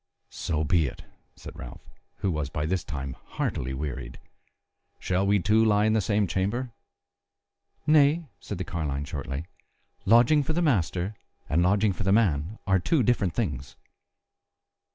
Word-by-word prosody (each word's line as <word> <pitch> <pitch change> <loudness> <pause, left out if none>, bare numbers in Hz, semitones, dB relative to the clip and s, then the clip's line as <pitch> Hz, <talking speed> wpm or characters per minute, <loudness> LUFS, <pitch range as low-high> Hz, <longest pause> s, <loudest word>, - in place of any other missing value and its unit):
"So 80 -2 -2
be 80 0 +2
it," - - -8 0.3
said - - -11
Ralph, - - -10 0.3
who 95 - +1
was 75 -3 -2
by 75 +1 -2
this 90 +2 -1
time 70 -2 -5 0.2
heartily 65 +1 -1
wearied, 65 -3 -5 0.8
"shall 95 +2 0
we 100 +1 +4
two 105 +4 +3
lie 105 -1 +3
in 110 - +3
the 110 - +3
same 105 +2 +1
chamber?" 105 +8 -1 1.1
"Nay," 155 +2 +4
said 100 - -6
the 95 - -3
carline 75 -5 -3
shortly, 70 +1 -5 0.6
"lodging 120 +7 +6
for 150 +3 -2
the 175 - +1
master 95 - +1 0.3
and 80 +5 +2
lodging 100 +3 +3
for 90 - -8
the 95 -1 +1
man 100 -3 +2
are 95 -2 +3
two 130 - +2
different 100 -7 +1
things." 70 - -3
95 Hz, 155 wpm, -27 LUFS, 75-110 Hz, 1.1 s, lodging